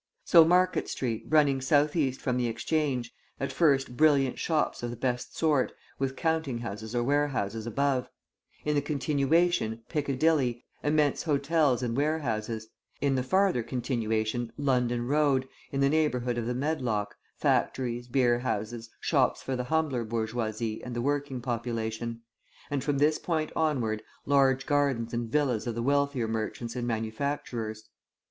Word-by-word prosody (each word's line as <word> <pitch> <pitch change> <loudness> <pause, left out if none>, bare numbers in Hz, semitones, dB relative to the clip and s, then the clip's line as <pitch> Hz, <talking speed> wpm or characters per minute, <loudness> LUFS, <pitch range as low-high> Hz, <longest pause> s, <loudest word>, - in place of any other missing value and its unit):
So 165 -2 +8
Market 180 +3 +2
Street 115 -4 -3
running 145 -4 +4
south 145 +3 +3
east 135 -5 0
from 125 -3 0
the 125 -1 +1
Exchange; 125 +1 -1 0.3
at 135 - -2
first 135 -6 +2
brilliant 140 -3 +3
shops 155 -3 0
of 120 - -3
the 120 - -5
best 125 0 -3
sort, 150 -5 +2 0.3
with 135 0 -1
counting 160 -6 0
houses 110 0 -6
or 120 - +2
warehouses 120 -6 0
above; 135 +1 0 0.6
in 150 - +1
the 145 - +2
continuation, 145 -3 +1
Piccadilly, 140 -4 +1 0.2
immense 150 -1 +2
hotels 145 -4 +2
and 115 -1 -1
warehouses; 120 -7 -1 0.3
in 140 -1 +1
the 130 - +1
farther 185 0 +2
continuation, 115 -2 -1
London 125 -4 +1
Road, 140 -1 +2 0.2
in 140 - -1
the 140 - +4
neighbourhood 125 -6 +1
of 115 - -3
the 125 - -1
Medlock, 125 -8 -1 0.2
factories, 120 -2 0
beerhouses, 120 -3 0
shops - - +1
for 135 - -2
the 125 0 -3
humbler 150 -4 0
bourgeoisie 110 0 -2
and 125 -1 -6
the 120 - -1
working 140 -2 -1
population; 115 -1 -3 0.5
and 140 -2 -1
from 145 0 0
this 150 +2 +3
point 155 -3 -1
onward, 125 -9 0 0.2
large 135 -2 +3
gardens 140 -6 +1
and 120 -1 -2
villas 130 -5 +1
of 115 - -2
the 115 - -2
wealthier 140 -3 +1
merchants 115 +1 -3
and 120 -1 -2
manufacturers. 110 -1 -3
130 Hz, 145 wpm, -28 LUFS, 115-145 Hz, 0.6 s, So